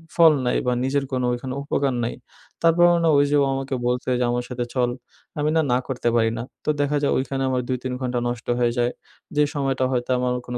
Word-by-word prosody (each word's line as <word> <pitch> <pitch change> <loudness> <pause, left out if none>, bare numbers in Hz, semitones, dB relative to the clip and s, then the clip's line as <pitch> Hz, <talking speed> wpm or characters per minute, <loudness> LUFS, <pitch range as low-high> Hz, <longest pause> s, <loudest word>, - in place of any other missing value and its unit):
ফল 165 -2 +7
নাই 125 - +1
বা 125 - +3
নিজের 135 +1 0
কোনো 130 -1 0
ওইখানে 130 +1 -4
উপকার 140 -1 0
নাই। 115 - -2 0.5
তারপরও 175 +1 +5
না 165 - +4
ওই 140 - +5
যে - - +3
ও - - +2
আমাকে 135 0 -3
বলছে 125 +1 -1
যে - - +2
আমার 120 0 -1
সাথে 125 -1 -3
চল 125 -1 +2 0.5
আমি 150 +1 +1
না, 160 - +4
না - - +4
করতে 125 -3 -1
পারি 115 -1 +3
না 115 - -3 0.2
তো - - 0
দেখা 145 +1 +1
যায় 140 - +2
ওইখানে 135 0 -2
আমার 130 -1 0
২-৩ 130 0 -3
ঘণ্টা 125 -1 -1
নষ্ট 120 -1 -5
হয়ে 120 -1 +2
যায়। 120 0 +2 0.5
যে 150 - +5
সময়টা 135 -2 0
হয়তো 125 -1 -1
আমার 125 0 0
কোনো 125 0 -4
130 Hz, 225 wpm, -23 LUFS, 125-140 Hz, 0.5 s, ফল